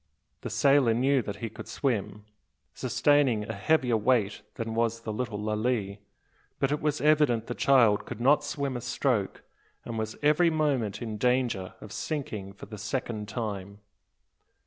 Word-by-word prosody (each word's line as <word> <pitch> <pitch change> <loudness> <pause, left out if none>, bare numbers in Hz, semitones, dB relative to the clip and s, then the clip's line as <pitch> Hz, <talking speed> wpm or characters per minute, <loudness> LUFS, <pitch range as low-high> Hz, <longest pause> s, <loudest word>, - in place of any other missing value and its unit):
The - - -5
sailor 135 -5 +4
knew 135 +2 +3
that 100 -2 -5
he - - -4
could - - -9
swim, 105 -6 -2 0.5
sustaining 140 -7 +2
a - - -5
heavier 125 +1 +2
weight 110 -2 +1
than 115 -1 -4
was 115 0 0
the 110 -2 -4
little 115 -2 -3
Lalee. 105 -1 -1 0.6
But 135 - 0
it 150 - -1
was 150 -1 0
evident 150 -7 +3
the 120 - -4
child 120 -6 +4
could 120 - -6
not 145 +4 +4
swim 140 -3 -3
a 120 - -4
stroke, 120 -4 -1 0.4
and 115 -1 -4
was 110 0 -3
every 150 +4 +4
moment 135 -10 0
in 110 -2 -4
danger 125 -6 0
of - - -10
sinking 105 -10 -4
for 100 - -11
the 105 - -9
second 110 -1 -3
time. 100 -3 -5
120 Hz, 160 wpm, -28 LUFS, 105-140 Hz, 0.6 s, sailor